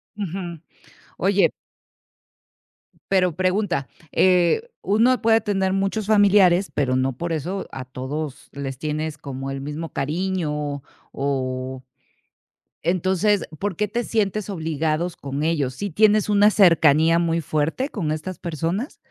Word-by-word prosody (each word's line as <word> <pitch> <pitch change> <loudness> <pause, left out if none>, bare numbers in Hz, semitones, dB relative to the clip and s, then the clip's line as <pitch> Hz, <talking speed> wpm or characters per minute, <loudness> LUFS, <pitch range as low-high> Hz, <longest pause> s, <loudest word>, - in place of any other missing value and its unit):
Ujú. 175 -4 -5 0.6
Oye 195 +1 +3 1.6
Pero 185 -4 +3
pregunta, 185 - 0 0.2
eh, 185 - +3
uno 230 +6 +3
puede 225 0 +4
tener 190 -2 0
muchos 195 +2 -1
familiares, 200 -3 +5
pero 130 -3 +1
no 130 +1 0
por 170 +7 -4
eso 180 +5 -3
a 130 -1 -6
todos 130 +3 -6
les 135 -2 -5
tienes 155 +1 -3
como 135 -1 -6
el 135 0 -4
mismo 150 +3 -5
cariño 150 -2 -2 0.3
o 130 -1 -3 1.0
entonces, 190 +4 +1
¿por 200 -2 -2
qué 210 +4 0
te 235 +4 -2
sientes 215 -3 -1
obligados 160 0 -1
con 140 +1 -5
ellos?, 150 -5 0
¿si 200 +9 -4
tienes 210 +4 +3
una 205 +1 +5
cercanía 165 -4 +5
muy 170 -1 +1
fuerte 160 - -1
con 165 -9 -3
estas 160 +4 -4
personas? 170 - -3
170 Hz, 125 wpm, -23 LUFS, 145-195 Hz, 1.6 s, familiares